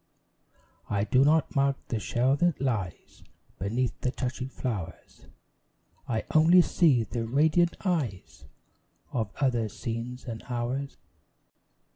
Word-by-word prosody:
I 100 -1 +1
do 125 +6 +3
not 155 +2 +2
mark 140 0 +2
the 115 - -1
shell 125 +5 +1
that 175 0 +1
lies 110 -10 -3 0.4
Beneath 115 +6 -2
the 125 - 0
touching 130 0 -4
flowers; 110 -11 -6 0.8
I 110 -2 -1
only 170 +3 +7
see 145 -12 +3
the 115 +1 -4
radiant 160 +7 +2
eyes 120 - -2 0.7
Of 110 -4 -1
other 120 -6 +1
scenes 120 +2 -5
and 115 -3 -6
hours. 125 +3 -3
125 Hz, 115 wpm, -28 LUFS, 115-140 Hz, 0.8 s, only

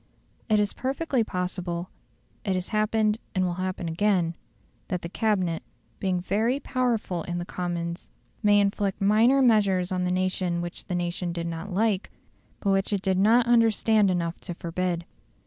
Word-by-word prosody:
It 215 -1 +4
is 205 -1 +1
perfectly 265 -1 0
possible 180 -2 -3 0.5
it 195 -3 0
has 185 0 -3
happened 215 0 +1 0.2
and 185 0 +2
will 175 - -1
happen 185 -2 -3
again 175 -1 +1 0.5
that 180 -2 -3
the 170 - -4
Cabinet, 185 -5 0 0.4
being 185 -2 0
very 220 +9 0
powerful 240 -10 -1
in 175 +1 -4
the 175 - -3
Commons, 175 -1 -4 0.3
may 205 -1 +5
inflict 200 -1 0
minor 225 +7 +4
measures 200 -6 +3
on 180 -1 0
the 180 - 0
nation 185 -1 0
which 175 0 -6
the 180 - -3
nation 175 0 -2
did 170 0 -4
not 170 +4 -5
like, 205 0 +1 0.5
but 200 - +1
which 195 +1 +1
it 200 -2 -1
did 190 -1 +1
not 230 +4 +5
understand 225 -3 +4
enough 170 -2 -1
to 175 - -7
forbid. 175 0 -2
190 Hz, 165 wpm, -26 LUFS, 175-215 Hz, 0.5 s, may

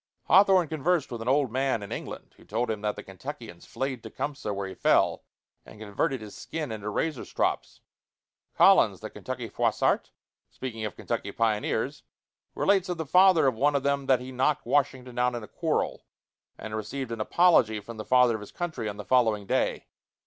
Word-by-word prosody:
Hawthorne 190 -2 +5
conversed 160 0 0
with 120 -2 -5
an 115 - -6
old 135 -2 +2
man 130 -3 0
in 100 - -9
England - - -7
who - - -19
told 115 +3 -2
him 105 -2 -4
that 105 0 -1
the - - -8
Kentuckians 110 - -9
flayed 130 -3 -3
Tecumseh 125 +1 -5
where 100 -1 -3
he 95 - -7
fell, - - +2 0.4
and 105 - -15
converted 110 +6 -2
his 105 -1 -10
skin 155 -6 -5
into 105 -1 -5
razor 145 +5 -2
strops. - - -2 0.7
Collins, - - +5
the - - -7
Kentucky - - -6
Froissart, - - 0 0.4
speaking 115 -4 -6
of 105 - -5
Kentucky 100 - -4
pioneers, 110 -1 -1 0.5
relates 195 -2 +2
of 180 - -2
the 160 - -3
father 180 0 +5
of 130 - +3
one 145 +6 +1
of 140 - 0
them 140 -1 0
that 130 -2 +4
he 130 +1 -8
knocked 135 +4 0
Washington 130 -3 0
down 125 0 +1
in 120 - -5
a - - -9
quarrel, - - -2 0.5
and 110 0 -6
received 115 +4 -5
an 115 -1 -3
apology 120 -7 +4
from 110 +2 -10
the 110 - -5
Father 125 -1 +4
of 110 - -4
his 105 - -10
Country 155 -11 -4
on 100 - -7
the 105 - -7
following 110 -5 +2
day. - - 0
125 Hz, 190 wpm, -27 LUFS, 110-145 Hz, 0.7 s, Hawthorne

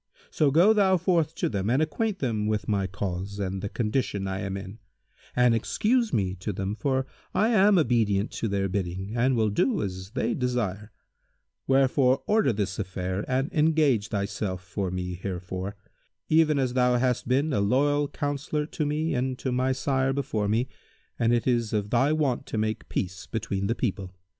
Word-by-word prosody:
So 150 -3 +3
go 175 +10 +5
thou 195 -3 +4
forth 165 -3 +1
to - - 0
them 100 -1 -2
and 130 +4 +3
acquaint 195 +7 0
them 115 - -1
with 105 -2 -1
my 100 -3 +1
case 95 +1 -4
and 95 -1 -3
the 100 - -3
condition 105 -3 -1
I 95 0 -3
am 95 -1 -3
in; 95 +3 -8 0.6
and 125 -1 +4
excuse 225 - +1
me 95 -4 0
to 90 - -3
them, 95 +1 -3
for 130 +3 0 0.3
I 210 +5 +3
am 205 -3 +5
obedient 115 - +2
to 115 - -3
their 100 -1 0
bidding 95 +2 -3
and 125 +2 +2
will 110 -2 +2
do 210 - +1
as 95 -1 -5
they 130 - 0
desire; 115 -5 -2 0.8
wherefore 135 0 +3
order 215 - +3
this 100 -3 -2
affair 95 0 -3
and 135 +3 -1
engage 150 -8 +3
thyself 100 -3 -3
for 90 +1 -3
me 90 0 -3
herefor, 95 +1 -4 0.5
even 155 -1 +4
as 130 -3 0
thou 125 -1 +3
hast 125 -1 0
been 140 +4 +1
a - - +2
loyal 145 +7 +2
counsellor 145 +1 -2
to 150 -1 -3
me 155 +2 -1
and 130 0 -1
to 130 - -3
my 130 +1 +1
sire 130 0 0
before 125 -7 -1
me, 115 +5 +1 0.5
and 115 0 +3
it 120 -1 +1
is 120 -4 +1
of 105 -1 -1
thy 130 +5 +3
wont 145 -6 0
to - - -4
make 110 0 -2
peace 90 -1 -3
between 100 -3 -2
the 115 - 0
people. 95 -6 -3
120 Hz, 180 wpm, -26 LUFS, 100-140 Hz, 0.8 s, go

